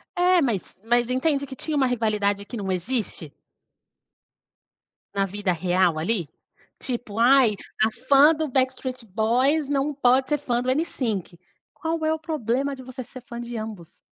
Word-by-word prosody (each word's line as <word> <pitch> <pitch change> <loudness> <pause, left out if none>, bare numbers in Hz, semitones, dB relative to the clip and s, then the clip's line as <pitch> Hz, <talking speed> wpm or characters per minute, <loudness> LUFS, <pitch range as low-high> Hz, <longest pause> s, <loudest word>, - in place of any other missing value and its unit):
É, 360 0 +4
mas 235 - -2
mas 240 +1 +2
entende 280 +2 +1
que 265 - -8
tinha 305 +4 -4
uma 270 - +3
rivalidade 210 -4 0
que 235 - -7
não 190 -2 -3
existe? 185 - -3 1.8
Na 200 -1 +1
vida 200 0 -2
real 175 -1 +1
ali, 175 -3 -1 0.5
tipo: 235 -4 -5
"Ai, 245 -2 +5 0.3
a 220 +1 +4
fã 275 +6 +5
do 315 0 -2
Backstreet 255 -1 -1
Boys 245 +9 +1
não 285 +1 0
pode 260 -1 +3
ser 295 - +2
fã 245 -4 -1
Nsync", 250 - -2 0.4
qual 320 0 -2
é 315 - +2
o 320 - -3
problema 280 -3 -1
de 260 - -11
você 255 0 -7
ser 255 +2 -12
fã 235 -1 -8
de 240 0 -5
ambos? 215 -6 -8
245 Hz, 155 wpm, -24 LUFS, 210-275 Hz, 1.8 s, Ai